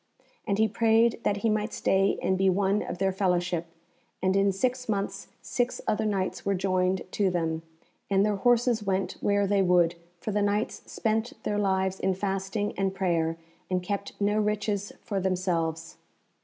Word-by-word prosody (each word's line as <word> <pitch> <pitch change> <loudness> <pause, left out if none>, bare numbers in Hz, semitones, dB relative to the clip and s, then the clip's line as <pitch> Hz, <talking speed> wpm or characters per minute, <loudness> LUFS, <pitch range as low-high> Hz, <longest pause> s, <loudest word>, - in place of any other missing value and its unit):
And 200 - +1
he 220 +1 +4
prayed 225 +2 +3
that 205 - +1
he - - +4
might 215 +1 -1
stay 195 +1 +2
and 190 - +2
be 190 0 +3
one 195 +2 +2
of - - -5
their 190 +1 +1
fellowship, 180 -3 0 0.5
and 190 +1 +1
in 195 0 +4
six 250 +5 -1
months 200 -1 -2 0.2
six 245 0 -1
other 215 0 +1
Knights 195 -3 -1
were 200 0 +1
joined 185 0 +1
to 200 -2 +1
them, 165 -2 -1 0.5
and 195 0 +3
their 210 -1 +1
horses 240 +1 +3
went 195 -1 0
where 205 0 +2
they 200 0 +2
would, 175 -2 +4 0.3
for 215 - -3
the 210 0 +1
Knights 205 +2 0
spent 225 +1 -1
their 210 0 0
lives 190 -1 +1
in 190 -1 +1
fasting 195 +2 -2
and 195 0 0
prayer, 165 -4 0 0.3
and 180 -1 0
kept 200 +1 -4
no 205 +1 +2
riches 210 -1 -1
for 200 -2 -2
themselves. 175 -3 -1
195 Hz, 170 wpm, -27 LUFS, 185-210 Hz, 0.5 s, he